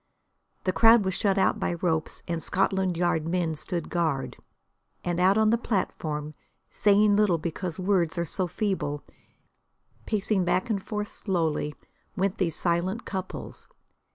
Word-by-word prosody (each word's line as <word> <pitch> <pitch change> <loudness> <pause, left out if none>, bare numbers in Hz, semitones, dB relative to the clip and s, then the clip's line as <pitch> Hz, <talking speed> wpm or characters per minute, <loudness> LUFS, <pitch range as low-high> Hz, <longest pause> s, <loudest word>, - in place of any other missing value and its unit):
The 185 - 0
crowd 225 -1 +6
was 190 - 0
shut 195 +1 +1
out 195 - +2
by 175 - -1
ropes 165 -2 -2
and 170 -1 -2
Scotland 190 -1 0
Yard 165 -2 +1
men 170 -2 0
stood 165 +2 -4
guard. 160 -6 -1 0.7
And 175 0 -1
out 190 +3 +4
on 220 0 +4
the 230 - +2
platform, 155 -9 -2 0.4
saying 205 0 +4
little 205 -5 +3
because 170 +2 -4
words 180 -3 +1
are 170 - 0
so 180 +3 -1
feeble, 180 -6 -2 1.0
pacing 210 -2 +1
back 185 +6 0
and 200 -3 0
forth 210 +1 -4
slowly, 160 -6 -1 0.4
went 195 0 -1
these 170 -5 +1
silent 180 +6 0
couples. 190 -2 -6
185 Hz, 145 wpm, -27 LUFS, 170-200 Hz, 1.0 s, crowd